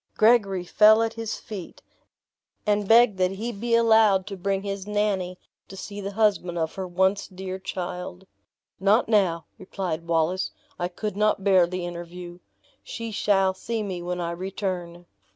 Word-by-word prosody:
Gregory 210 -5 +4
fell 215 +4 +5
at 225 0 -2
his 225 -1 -4
feet, 195 -6 -9 0.8
and 205 -1 +1
begged 225 -3 +5
that 185 0 +3
he 225 +5 -4
be 230 +2 0
allowed 220 -4 +4
to 200 -1 -6
bring 195 +1 -2
his 200 -1 -5
Nannie 200 -3 -1 0.3
to 195 - -11
see 205 +1 -7
the 200 +1 -5
husband 195 -5 +1
of 160 -1 -1
her 190 -1 -5
once 190 +3 +1
dear 190 0 -6
child. 180 0 -6 0.5
"Not 205 +5 +3
now," 185 -7 +2
replied 180 -3 -4
Wallace, 170 +3 +1 0.3
"I 175 - 0
could 200 +3 -5
not 210 -1 +1
bear 190 -3 +5
the 180 0 -4
interview 175 0 -8 0.4
she 230 -1 -6
shall 195 -2 +2
see 220 +3 -4
me 185 -4 -4
when 180 +1 -3
I 170 -1 -2
return." 175 -1 -5
190 Hz, 160 wpm, -25 LUFS, 180-210 Hz, 0.8 s, fell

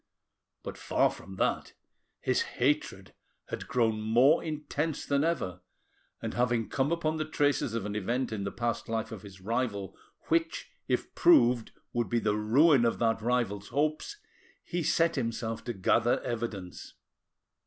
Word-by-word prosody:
But, - - -7
far - - +2
from 95 - -11
that, - - -1 0.5
his - - +1 0.2
hatred 125 -8 0 0.4
had - - -5
grown 110 -3 +1
more 120 +8 +4
intense 155 0 -3
than 140 0 +1
ever, 95 - -1 0.6
and - - -3
having 120 -2 +1
come 135 +3 0
upon 160 -2 0
the 155 0 -3
traces 145 -6 +1
of 115 - -2
an 105 0 -4
event 120 +5 -1
in 105 -3 -3
the 100 - -3
past 120 -1 -3
life 115 +1 -2
of 110 -4 -7
his 100 -2 -13
rival 100 -3 -2 0.3
which 330 0 0 0.2
if - - -1
proved 125 - +4 0.2
would 120 -4 0
be 120 - +1
the 105 -2 +1
ruin 125 +6 +4
of 115 - +2
that 115 -1 +1
rival's 115 -4 0
hopes, 155 - -1 0.5
he 175 - -3
set 165 0 +2
himself 115 -2 -2
to 120 - -2
gather 110 +4 +2
evidence. 110 -6 -5
120 Hz, 155 wpm, -29 LUFS, 110-145 Hz, 0.6 s, more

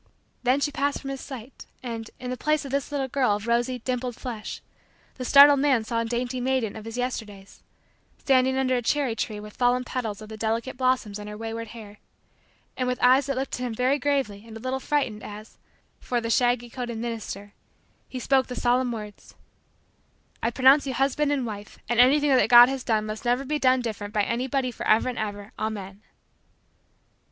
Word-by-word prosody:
Then 255 +2 +2
she 290 +1 0
passed 285 0 -1
from 275 - -6
his 270 - -6
sight 260 -2 -10 0.2
and, 230 -2 -5
in 250 0 -4
place 305 +1 0
of 275 - -7
this 280 +1 -2
little 275 -2 -1
girl 255 -5 +1
of 205 +1 -6
rosy, 240 +2 +1
dimpled, 250 0 -3
flesh, 230 -5 -6 0.5
the 255 - -7
startled 280 +2 +8
man 270 -5 +3
saw 230 +1 -2
a - - -2
dainty 245 +2 -2
maiden 255 -4 0
of 220 -1 -9
his 225 +1 -6
Yesterdays, 215 -6 -5 0.6
standing 260 -1 +2
under 260 -1 +1
a 245 - 0
cherry 260 -1 0
tree 215 -1 -3
with 210 0 -10
fallen 250 0 +2
petals 230 -5 -4
of 215 - -10
the 220 - -8
delicate 225 +4 -2
blossoms 250 -5 0
in 210 - -8
her 210 0 -7
wayward 225 +1 -5
hair, 210 -2 -11 0.8
and 255 - -1
with 250 0 0
eyes 260 +2 +5
that 275 - -1
looked 265 -1 -3
at - - -4
him 240 -3 -3
very 255 +4 +1
gravely 270 -8 -1
and 225 0 -9
a - - -10
little 255 +3 -2
frightened 260 -7 -1
as, 215 +1 -10 0.4
for 245 - -1
the 230 0 -3
shaggy 245 0 +2
coated 240 -1 -5
minister, 220 -3 -5 0.6
he 260 - -6
spoke 265 +1 +2
the 250 - -6
solemn 245 +1 +1
words: 210 -3 -9 1.1
"I 230 - +1
pronounce 265 +4 +5
you 260 - -2
husband 280 +3 +1
and 275 -4 0
wife 210 -2 -7
and 240 0 0
anything 285 +3 +5
that - - +3
God 240 +1 +9
has 270 -1 -3
done 215 -2 +1
must 215 0 -6
never 245 +2 +1
be 300 +2 -1
done 255 -2 +5
any 255 -1 -1
different 210 -2 -5
by 210 - +3
anybody 255 +3 -1
forever 225 +1 +2
and 250 - -5
ever, 205 -1 -5
Amen." 205 -2 -5
245 Hz, 200 wpm, -25 LUFS, 220-265 Hz, 1.1 s, God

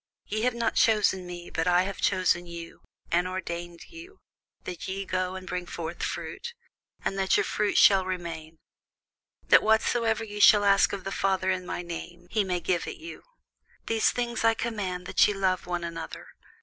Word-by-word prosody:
Ye 215 +1 -3
have 250 +1 +1
not 235 -1 0
chosen 205 -4 +3
me, 175 -1 -8
but 165 +2 -1
I 180 0 +4
have 195 0 -5
chosen 180 -2 +2
you, 170 -1 -9 0.3
and 175 +1 +2
ordained 175 -2 -5
you, 350 +4 -12 0.5
that 180 - -6
ye 195 +1 -3
should 195 - -8
go 185 0 -1
and 190 0 -7
bring 180 0 -4
forth 170 0 -6
fruit, 475 0 -5 0.5
and 195 - -1
that 190 0 +3
your - - +2
fruit 210 -1 0
should 195 -2 +6
remain: 165 -3 -5 0.9
that - - +8
whatsoever 225 +1 +2
ye 210 -1 -7
shall 205 0 +7
ask 200 -1 +4
of 195 -2 -5
the 195 - -4
Father 190 -1 +1
in 185 -1 -3
my 175 - -4
name, 175 +1 -8
he 215 -2 +2
may 180 -2 -1
give 175 -1 -1
it - - -6
you. 335 -1 -9 0.6
These 225 -1 +2
things 240 -1 -2
I 225 0 +4
command 200 -7 -3
you, - - -17
that - - +4
ye 205 - -1
love 185 -2 0
one 175 -1 -2
another. 165 -1 -7
185 Hz, 190 wpm, -27 LUFS, 175-210 Hz, 0.9 s, that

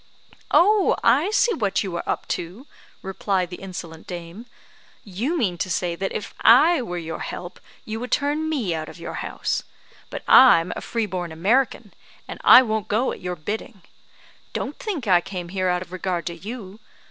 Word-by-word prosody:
"Oh, 410 +3 +4
I - - +4
see 455 +2 +2
what 200 - 0
you 190 -3 -5
are - - -3
up - - -2
to," 185 +11 -5 0.4
replied 190 -1 -1
the 180 - -6
insolent 170 -4 -8
dame; 175 +6 -8 0.6
"you 225 - -2
mean 185 - -1
to 185 - -2
say 175 -1 -1
that 195 +2 -3
if 210 - -5
I 305 +7 +6
were 180 -7 -5
your 165 -1 -5
help 175 0 -7 0.3
you 220 +1 -4
would 250 +1 -6
turn 295 +2 0
me 245 - -1
out 155 -1 -4
of - - -12
your 170 - -6
house; - - -2 0.5
but - - -7
I'm 180 -10 +7
a - - -5
free 230 -2 -2
born 180 -4 -4
American, 215 +5 0 0.3
and - - -8
I 255 - +9
won't 220 -4 -2
go 225 +5 +1
at - - -8
your 180 0 -3
bidding. 200 +3 -6 0.7
Don't - - -4
think 365 - -4
I 180 -4 +4
came 180 -2 -6
here 185 0 -1
out 180 0 0
of 180 - -20
regard 180 -2 -3
to 170 - -4
you. 205 +1 -8
195 Hz, 185 wpm, -23 LUFS, 175-240 Hz, 0.7 s, I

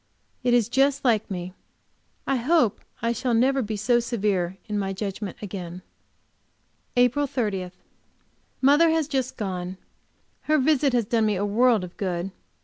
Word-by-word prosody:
It 245 -1 +3
is 235 -3 +3
just 275 +3 +2
like 220 -4 +2
me; 180 -1 -5 0.7
I 270 - +1
hope 255 - +2 0.2
I 230 - +2
shall 235 +1 0
never 265 +4 +3
be 215 -2 -3
so 240 +4 +3
severe 200 -6 -1
in 210 -1 -2
my 195 -1 -2
judgment 200 -1 -5
again. 180 -3 -6 1.1
APRIL 250 +4 +3
30. 205 -8 -2 0.9
Mother 290 +5 +5
has 320 -2 +1
just 265 -3 -2
gone. 185 -3 -4 0.7
Her 310 - +5
visit 280 -1 +2
has 240 -3 +2
done 225 0 +1
me 210 - +1
a 195 +2 -1
world 225 0 +3
of 180 0 -9
good. 185 -1 -2
225 Hz, 150 wpm, -25 LUFS, 195-260 Hz, 1.1 s, Mother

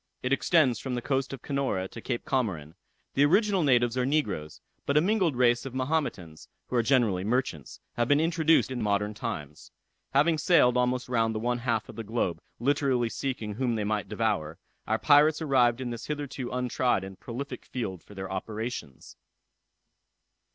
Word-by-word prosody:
It 125 +2 +1
extends 135 - +3
from 130 -2 -4
the 120 - -2
coast 135 -1 -1
of 135 -2 -8
Canora 135 -10 -1
to 115 - -9
Cape 120 0 -3
Comorin. 100 - -1 0.4
The 140 - +3
original 195 +5 +3
natives 120 -5 +3
are - - +2
negroes; 105 - -1 0.3
but 140 - +2
a - - +8
mingled 185 - +1
race 120 -1 +3
of 135 -1 -7
Mahometans, 130 - -2 0.2
who - - -5
are 120 - +4
generally 115 -7 +2
merchants, 105 - -2 0.2
have 120 -1 +1
been 145 +2 +4
introduced 165 -3 +3
in 125 -2 -3
modern 105 0 0
times. 90 - -6 0.5
Having 155 +3 +4
sailed 145 -6 +4
almost 125 0 +1
round 115 -2 +1
the - - -1
one 120 +2 -1
half 115 -3 -1
of - - -11
the 115 - -4
globe, 110 -5 -2 0.2
literally 130 -2 +1
seeking 115 -5 -4
whom 120 +1 -1
they 110 - -1
might 105 -2 -2
devour, 105 -8 -1 0.3
our 110 - +1
pirates 150 +4 +5
arrived 130 -6 +3
in 125 -2 -4
this 120 - -7
hitherto 145 -4 -4
untried 125 -3 0
and 95 -1 -9
prolific 130 +4 -6
field 95 -9 -5
for 105 - -15
their 95 -1 -6
operations. 105 - -5
125 Hz, 175 wpm, -28 LUFS, 110-140 Hz, 0.5 s, a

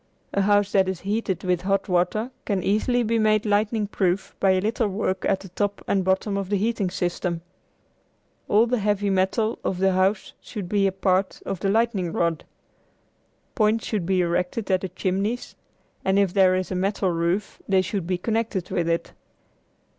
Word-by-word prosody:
A 200 - +2
house 205 0 +3
that 190 -1 +3
is 190 -2 -4
heated 200 -2 -2
with 180 -2 +1
hot 195 +1 0
water 185 +7 0
can 195 -4 -1
easily 240 +5 +1
be 230 0 +1
made 215 0 +3
lightning 210 +1 +1
proof 190 -2 -1
by 195 - +3
a 190 0 +4
little 220 +3 0
work 190 -1 -2
at 195 -1 +1
the 195 - -10
top 200 +3 -2
and 195 -1 +1
bottom 190 +2 0
of 195 -2 -3
the 205 - +2
heating 210 -2 0
system. 175 -1 -2 1.1
All 215 +3 +4
the 245 0 0
heavy 205 -1 +1
metal 195 +4 +1
of 185 - -1
the 190 +1 +3
house 190 +2 +1
should 205 -6 -6
be 200 +1 +2
a - - +1
part 190 0 0
of 195 -2 -3
the 195 - 0
lightning 210 -5 +1
rod. 165 -2 -1 1.1
Points 220 0 +2
should 200 -6 -2
be 185 -1 +2
erected 180 +4 -1
at 185 -1 +2
the 190 - -4
chimneys, 200 +8 -2 0.5
and 190 +1 +2
if 200 -3 +2
there 185 -2 +5
is 185 0 -2
a - - -1
metal 190 0 0
roof 170 +4 -1
they 190 -1 +4
should 185 -2 -3
be 180 -1 0
connected 220 -2 -2
with 170 -1 0
it. 165 0 -1
195 Hz, 185 wpm, -24 LUFS, 185-210 Hz, 1.1 s, there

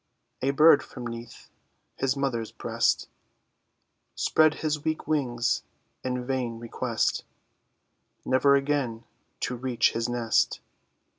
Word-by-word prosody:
A 135 - +1
bird 145 +1 +6
from 125 -2 -9
'neath 115 0 -8 0.4
his 135 +1 0
mother's 120 -5 -1
breast, - - 0 1.1
Spread 155 0 +3
his 150 -2 -2
weak 155 0 -2
wings 120 -6 0 0.4
in 125 -1 -2
vain 125 -3 -2
request; 115 0 -1 1.0
Never 130 +2 +4
again 135 -5 0 0.4
to 125 - -1
reach 125 -1 +1
his 115 +1 -2
nest. 120 -2 +1
130 Hz, 105 wpm, -27 LUFS, 120-140 Hz, 1.1 s, bird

